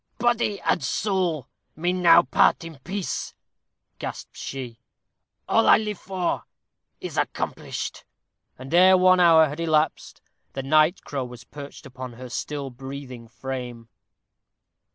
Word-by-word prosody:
"Body 240 Hz, -3 st, +1 dB
and -, -, +1 dB
soul 180 Hz, 0 st, -1 dB, 0.3 s
may 175 Hz, +3 st, 0 dB
now 180 Hz, -2 st, +6 dB
part 130 Hz, +5 st, +3 dB
in 165 Hz, -4 st, -10 dB
peace," 190 Hz, +7 st, -4 dB, 0.6 s
gasped -, -, -7 dB
she. 125 Hz, -4 st, -7 dB, 0.7 s
"All -, -, +3 dB
I -, -, +8 dB
live 210 Hz, -3 st, -4 dB
for 185 Hz, -2 st, -2 dB, 0.5 s
is -, -, -6 dB
accomplished." -, -, -3 dB, 0.5 s
And 130 Hz, +4 st, -9 dB
ere 185 Hz, +2 st, +7 dB
one 185 Hz, 0 st, +5 dB
hour 165 Hz, -2 st, +7 dB
had 150 Hz, +2 st, -7 dB
elapsed, 160 Hz, -2 st, 0 dB, 0.3 s
the 135 Hz, -, -4 dB
night 155 Hz, +5 st, +3 dB
crow 135 Hz, -3 st, -4 dB
was 125 Hz, -1 st, -11 dB
perched 145 Hz, -1 st, -11 dB
upon 130 Hz, -1 st, -8 dB
her 125 Hz, +1 st, -9 dB
still 140 Hz, +2 st, -4 dB
breathing 130 Hz, -2 st, -9 dB
frame. 120 Hz, -1 st, -7 dB
150 Hz, 130 wpm, -24 LUFS, 130-180 Hz, 0.7 s, I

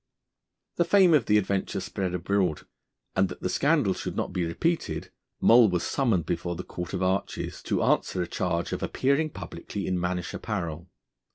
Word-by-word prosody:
The 170 Hz, -, +4 dB
fame 185 Hz, 0 st, +5 dB
of 140 Hz, -7 st, +3 dB
the 105 Hz, -, +5 dB
adventure 100 Hz, -1 st, -1 dB
spread 95 Hz, -1 st, -3 dB
abroad, 90 Hz, -2 st, 0 dB, 0.5 s
and 95 Hz, 0 st, +3 dB
that 90 Hz, -, -9 dB
the -, -, -1 dB
scandal 140 Hz, -, +2 dB
should -, -, -5 dB
not -, -, -2 dB
be 90 Hz, -1 st, 0 dB
repeated 160 Hz, -, -1 dB, 0.3 s
Moll 115 Hz, -1 st, +7 dB
was 90 Hz, -2 st, 0 dB
summoned 115 Hz, -, +1 dB
before 85 Hz, +1 st, -2 dB
the 90 Hz, -, -5 dB
Court 90 Hz, +1 st, -6 dB
of 95 Hz, -, -1 dB
Arches 95 Hz, +1 st, -2 dB
to -, -, 0 dB
answer -, -, +1 dB
a -, -, -5 dB
charge 85 Hz, -1 st, -1 dB
of -, -, -3 dB
appearing 140 Hz, +4 st, +1 dB
publicly 100 Hz, -7 st, -6 dB
in 90 Hz, -1 st, 0 dB
mannish 90 Hz, 0 st, -2 dB
apparel. 85 Hz, -5 st, -4 dB
95 Hz, 175 wpm, -27 LUFS, 90-115 Hz, 0.5 s, Moll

